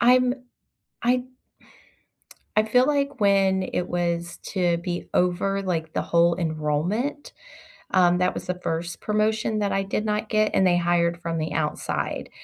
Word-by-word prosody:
I'm 250 +1 +5 0.7
I 250 +1 +2 1.3
I 215 - +5
feel 250 +4 +3
like 280 -2 0
when 195 -2 +3
it 180 -1 -2
was 170 -1 -2
to 175 -3 +1
be 175 0 -4
over, 190 +2 +1
like, 165 -4 -2
the - - -1
whole 170 0 +3
enrollment, 165 - -2 0.6
um, 180 -2 +4
that 180 0 +1
was - - -7
the 180 0 -3
1st 165 0 -3
promotion 215 0 0
that 205 -1 0
I 195 - +1
did 200 +2 -2
not 210 0 -1
get, 215 0 +2
and 190 - +4
they 175 -1 +3
hired 170 0 +1
from 170 -1 -3
the 160 0 -2
outside, 150 0 -2
185 Hz, 155 wpm, -24 LUFS, 170-215 Hz, 1.3 s, I'm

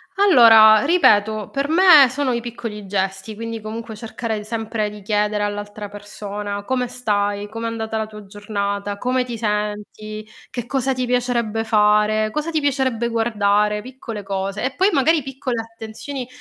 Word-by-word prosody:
Allora, 230 - +7
ripeto 215 - +3
per 275 +1 -2
me 325 -5 +7
sono 265 0 -1
i 235 - -2
piccoli 230 -3 -7
gesti, 195 +1 -3
quindi 230 +1 -6
comunque 220 +1 -7
cercare 220 0 -5
sempre 220 -1 -3
di 210 0 -11
chiedere 210 +1 0
all'altra 205 0 -5
persona: 205 0 -6
"Come 250 0 -1
stai? 205 -4 -1
Com'è 225 +2 -5
andata 225 -1 -3
la 220 - -1
tua 210 -1 -11
giornata? 200 0 -4
Come 250 +3 0
ti 240 -2 -6
senti? 210 0 -4 0.2
Che 245 -3 -5
cosa 265 +1 0
ti 255 0 -2
piacerebbe 240 -3 0
fare? 215 0 +3
Cosa 300 +7 -3
ti 315 - +1
piacerebbe 260 -5 0
guardare?" 210 -2 +1
Piccole 245 -4 -8
cose 195 +1 -3
e 260 +1 -2
poi 380 +3 +3
magari 310 0 +2
piccole 260 -3 -3
attenzioni, 230 +4 -8
220 Hz, 155 wpm, -20 LUFS, 210-250 Hz, 0.2 s, Allora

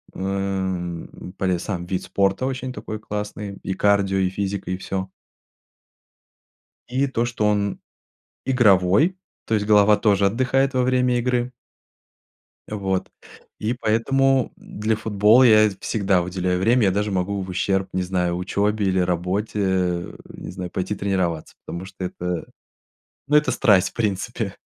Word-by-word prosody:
Эм, 95 -3 -3
полез 90 -3 0
сам 90 -4 -4
вид 90 0 -3
спорта 100 +5 0
очень 130 -1 -4
такой 110 0 -6
классный, 105 -1 -5
и 95 - -2
кардио, 100 -1 +2
и 95 -1 +2
физика, 95 -1 -3
и 90 - -1
всё. 95 0 -4 1.8
И 130 +3 +1
то, 125 -3 -1
что 115 -3 -1
он 105 -1 0 0.7
игровой, 120 - +4 0.3
то 115 - 0
есть 105 -1 +1
голова 105 0 +5
тоже 105 -2 +3
отдыхает 130 +5 +1
во 130 - +2
время 125 0 +2
игры. 125 0 0 1.2
Вот. 95 -3 -2 0.5
И 110 +3 -1
поэтому 130 +3 +1
для 110 +2 -2
футбола 110 +3 +4
я 110 -3 +6
всегда 95 -4 +1
уделяю 90 0 -1
время. 115 +5 +3
Я 95 - +4
даже 105 +2 -1
могу 95 +1 -1
в 95 - -6
ущерб, 95 +1 0
не 95 - 0
знаю, 90 -1 -1
учебе 100 +3 0
или 95 0 +1
работе, 90 +4 -1 0.7
не - - -9
знаю, 90 -1 -6
пойти 95 +3 -2
тренироваться, 95 -5 -2
потому 85 +2 -6
что 95 0 -9
это, 90 -1 -4 0.8
ну, 150 - +2
это 150 0 +4
страсть, 95 -7 +4
в - - -24
принципе. 105 -5 -2
100 Hz, 140 wpm, -22 LUFS, 95-110 Hz, 1.8 s, я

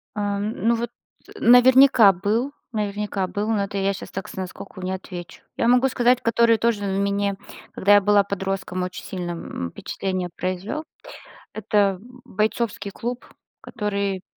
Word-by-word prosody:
Ам. 205 +1 -2
Ну 235 - +4
вот. 235 +1 -3 0.5
Наверняка 250 -2 +7
был, 210 +9 -1 0.2
наверняка 205 -2 -2
был, 205 +3 -3
но 215 -3 +1
это 200 0 -5
я 195 0 +1
щас 195 - -9
так 195 - -5
с - - -10
наскоку 190 +1 -7
не 185 +1 -3
отвечу. 180 -2 -7
Я 235 - +1
могу 250 +2 +5
сказать, 250 -1 +3
который 230 0 +3
тоже 225 -2 0
мне, 200 0 0 0.3
когда 200 +2 +3
я 205 - +7
была 205 0 +4
подростком, 195 -2 -3
очень 180 0 -6
сильно, 180 -2 -4
м, 125 - -5
впечатление 185 -2 -4
произвел. 185 - -3 0.7
Это 205 -2 +1 0.3
"Бойцовский 215 0 -2
клуб", 240 +5 -5 0.3
который, 200 -4 -3
200 Hz, 145 wpm, -23 LUFS, 190-225 Hz, 0.7 s, Наверняка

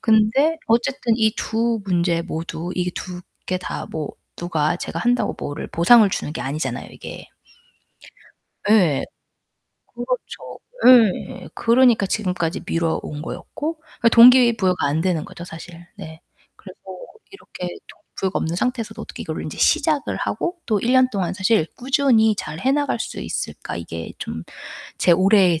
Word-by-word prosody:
근데 225 +9 +3
어쨌든 240 +1 +1
이 220 -2 +2
2 225 0 -1
문제 170 -2 +1
모두 170 0 -5
이게 180 0 -1
2 180 -1 -6 0.3
개 185 0 -1
다 180 - -5
뭐 155 -2 -5 0.3
누가 165 -1 -1
제가 - - -5
한다고 245 +1 +1
뭐를 145 +2 -5
보상을 210 +5 +5
주는 150 - -3
게 - - -5
아니잖아요, 150 +4 -4
이게. - - -10 1.4
예. 170 -11 +4 0.9
그렇죠. 245 +1 -5 0.3
예. 235 -6 +4
그러니까 235 -3 +4
지금까지 185 -4 -2
미뤄온 160 -2 -2
거였고. 310 - -5 0.2
그니까 230 - +5
동기 240 0 +7
부여가 185 -6 +1
안 145 +3 0
되는 170 -3 0
거죠 175 - -10
사실. 170 0 -11
네. 160 0 -10 0.4
그래서 - - -14 0.5
'이렇게 185 - -8 0.2
동기 - - -17
부여가 190 -1 -1
없는 165 +2 -2
상태에서도 245 0 -2
어떻게 - - -8
이거를 - - -5
인제 - - -7
시작을 305 -4 +2
하고 350 +1 -2
또 215 -2 +1
1 240 - 0
년 255 -1 +5
동안 190 -5 -2
사실 190 -4 +2
꾸준히 245 -4 +3
잘해 205 - -2
나갈 285 -4 0
수 - - -5
있을까.' - - -5
이게 85 -1 -7
좀 80 +1 -6 0.5
제 175 - +4
올해의 185 -2 +4
195 Hz, 300 characters per minute, -21 LUFS, 170-240 Hz, 1.4 s, 동기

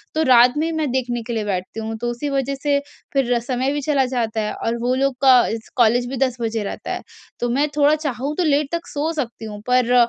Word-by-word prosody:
तो 315 - +2
रात 245 -2 +6
में 320 +2 0
मैं 310 -3 -1
देखने 245 -2 -1
के 240 - -3
लिए 220 -2 -1
बैठती 185 +1 -3
हूँ। 225 0 -4
तो 240 - -1
उसी 240 +5 -4
वजह 275 0 -1
से 285 -1 +3 0.3
फिर 250 -3 +2
समय 260 +1 0
भी 290 - -2
चला 275 -3 +3
जाता 225 -3 -1
है 210 - -2
और 230 +1 -2
वो 250 +1 +1
लोग 270 0 +1
का 265 -2 +7
इस 225 0 -5
कॉलेज 240 +1 +4
भी 265 - -4
10 255 -2 -4
बजे 225 -1 -1
रहता 200 - -5
है। - - -4 0.4
तो 240 - -1
मैं 280 +5 +2
थोड़ा 295 +1 +5
चाहूँ 290 -1 -3
तो 360 - +2
लेट 295 -1 +2
तक 340 0 -3
सो 300 +2 -1
सकती 235 -3 -7
हूँ 210 -1 -7
पर, 250 -1 +3
250 Hz, 245 wpm, -21 LUFS, 235-285 Hz, 0.4 s, का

